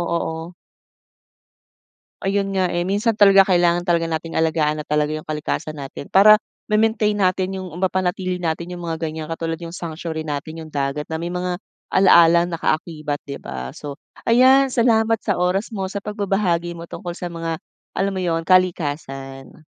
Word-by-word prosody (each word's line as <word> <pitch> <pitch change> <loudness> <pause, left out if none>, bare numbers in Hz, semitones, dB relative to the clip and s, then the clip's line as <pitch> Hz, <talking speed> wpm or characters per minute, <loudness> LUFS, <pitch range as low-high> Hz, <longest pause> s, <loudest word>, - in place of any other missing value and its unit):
oo. 165 +1 -4 1.7
Ayun 195 0 0
nga, 185 -2 +1
eh, 175 0 -1
minsan 205 +3 0
talaga 195 -2 +7
kailangan 175 -1 +3
talaga 170 -2 +1
nating 165 0 -3
alagaan 155 -2 +1
na 150 - -5
talaga 150 0 +1
'yong 155 0 -4
kalikasan 155 0 -3
natin 135 +1 -8
para 210 +5 +7 0.3
ma-maintain 215 -1 +2
natin 190 0 0
'yong 185 -3 -7
mapanatili 185 -1 0
natin 170 0 -3
'yong 175 -1 -6
mga 165 -1 -2
ganyan 160 -1 -3
katulad 165 0 -3
'yong 170 0 -8
sanctuary 160 -2 -5
natin 155 +2 -5
'yong 155 - -10
dagat 140 +1 -2
na 160 - -2
may 170 +2 -4
mga 180 0 -2 0.3
ala-alang 170 -2 +5
nakaakibat, 155 -2 -2
'di 140 -1 -7
ba. 65 +1 -6
So, 145 -1 -8 0.3
ayan 260 +3 +6
salamat 225 -2 +3
sa 205 -2 -1
oras 195 +6 0
mo 190 -2 -3
sa 200 - -5
pagbabahagi 195 -4 -1
mo 170 - -8
tungkol 175 0 -7
sa - - -5
mga 165 -2 -4 0.4
alam 195 0 0
mo 190 - -3
'yon, 165 -2 -1
kalikasan. 145 -6 -1
175 Hz, 160 wpm, -21 LUFS, 160-195 Hz, 1.7 s, talaga